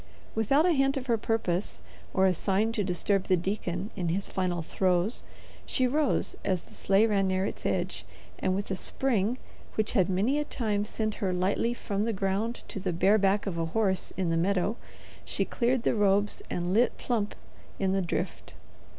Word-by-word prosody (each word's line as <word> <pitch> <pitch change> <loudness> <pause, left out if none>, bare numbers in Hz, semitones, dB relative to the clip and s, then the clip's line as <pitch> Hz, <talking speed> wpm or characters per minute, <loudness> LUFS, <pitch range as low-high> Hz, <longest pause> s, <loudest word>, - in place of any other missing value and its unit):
Without 275 - +3
a 360 - +4
hint 275 -2 +2
of 260 - -4
her 235 -3 +2
purpose, 210 -5 -1 0.3
or 190 - +3
a 185 - +4
sign 195 +5 +1
to 220 -2 0
disturb 195 +1 0
the 185 - +3
deacon 185 +1 -3
in 175 -2 -1
his 195 +4 0
final 180 -3 -1
throes, 185 +5 +1 0.4
she 255 - +1
rose 290 +3 +1
as 185 -2 0
the - - -17
sleigh 195 +3 +3
ran 200 -3 +2
near 185 0 +1
its - - -3
edge, - - -1 0.4
and 185 - +1
with 200 0 -3
a - - +1
spring 230 +2 0 0.4
which 215 0 +1
had 190 -6 +2
many 210 +10 +2
a - - +1
time 210 -7 -1
sent 215 0 -2
her 190 -2 +1
lightly 185 +6 +1
from 205 -2 -2
the 230 - 0
ground 200 +4 -1
to - - -4
the 185 -1 -1
bare 190 +5 +4
back 200 +1 +2
of 180 -4 -3
a 165 - +1
horse 195 -4 +1
in 180 -3 0
the 165 - +2
meadow, 195 +4 +1 0.5
she - - -1
cleared 245 0 0
the - - +2
robes 205 -1 +2
and 175 +1 -1
lit 235 +3 +3
plump 220 -4 -1 0.4
in 190 -1 +1
the 195 0 +2
drift. 175 - -3
200 Hz, 195 wpm, -29 LUFS, 185-225 Hz, 0.5 s, a